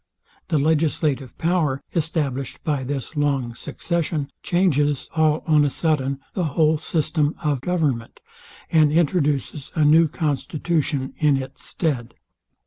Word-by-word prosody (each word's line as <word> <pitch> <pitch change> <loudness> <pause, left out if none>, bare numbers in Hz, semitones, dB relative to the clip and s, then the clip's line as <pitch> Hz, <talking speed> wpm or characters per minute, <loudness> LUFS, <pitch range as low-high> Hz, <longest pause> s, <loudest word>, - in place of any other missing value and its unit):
The 155 - +1
legislative 150 -3 0
power, 160 -6 +1
established 145 -6 -2
by 145 -4 -1
this 140 +3 -4
long 140 -5 0
succession, 155 +2 -3
changes 150 -6 +1
all 155 -1 +2
on 155 -2 +4
a 145 - +2
sudden 140 -3 0
the 185 - -1
whole 155 -1 +4
system 155 -1 0
of 145 -4 0
government, 145 -9 -1 0.5
and 155 -3 +5
introduces 150 -4 0
a 155 -2 +3
new 160 +2 +6
constitution 150 -2 -1
in 150 -3 +4
its 130 0 -7
stead. 125 -8 -2
150 Hz, 125 wpm, -23 LUFS, 140-160 Hz, 0.5 s, new